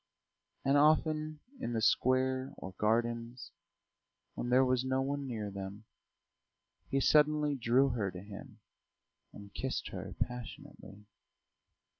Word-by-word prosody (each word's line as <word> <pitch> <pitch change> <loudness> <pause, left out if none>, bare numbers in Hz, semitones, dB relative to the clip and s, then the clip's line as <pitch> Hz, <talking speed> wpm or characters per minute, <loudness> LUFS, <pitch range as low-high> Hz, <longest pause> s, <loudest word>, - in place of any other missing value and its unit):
And 140 +1 +4
often 155 0 +2 0.2
in 120 - -3
the 115 - 0
square 130 +2 +2
or 95 - -7
gardens, 120 +3 -1 0.8
when 120 - -4
there 130 +1 +5
was 130 -1 +1
no 130 0 0
one 140 0 -3
near 110 -5 -4
them, 100 +2 -7 1.0
he 135 - +1
suddenly 150 +1 +4
drew 130 +1 +3
her 100 -4 -1
to 90 0 -8
him 100 -1 -11 0.7
and 100 0 -12
kissed 130 -1 -3
her 95 0 -7
passionately. 115 -4 -6
125 Hz, 120 wpm, -33 LUFS, 105-135 Hz, 1.0 s, there